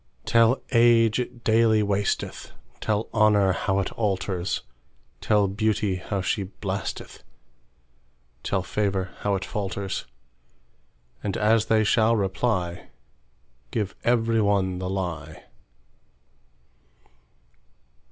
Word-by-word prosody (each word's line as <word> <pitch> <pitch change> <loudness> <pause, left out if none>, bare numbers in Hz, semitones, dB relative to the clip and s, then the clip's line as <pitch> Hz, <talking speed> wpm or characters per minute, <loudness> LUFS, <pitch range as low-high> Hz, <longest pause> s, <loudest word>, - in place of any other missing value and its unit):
Tell 115 +2 +4
age 115 -2 +4
it 120 -1 -5
daily 110 -1 +4
wasteth; 100 0 -2 0.3
Tell 110 0 -1
honour 105 -3 +4
how 95 +2 -1
it 95 - -1
alters; 95 -4 -2 0.6
Tell 105 -2 +2
beauty 105 -1 0
how 95 +2 -3
she 100 +3 -1
blasteth; 95 +1 -5 1.2
Tell 95 -2 -1
favour 95 -2 -1
how 100 -1 0
it 95 - -3
falters:And - - -7
as 110 +1 +3
they 110 -1 +3
shall 110 +2 +3
reply, 95 -3 -1 0.8
Give 100 - -3
every 115 -1 +2
one 95 -3 +1
the 90 0 -3
lie. 85 -5 -4
100 Hz, 95 wpm, -25 LUFS, 95-110 Hz, 1.2 s, Tell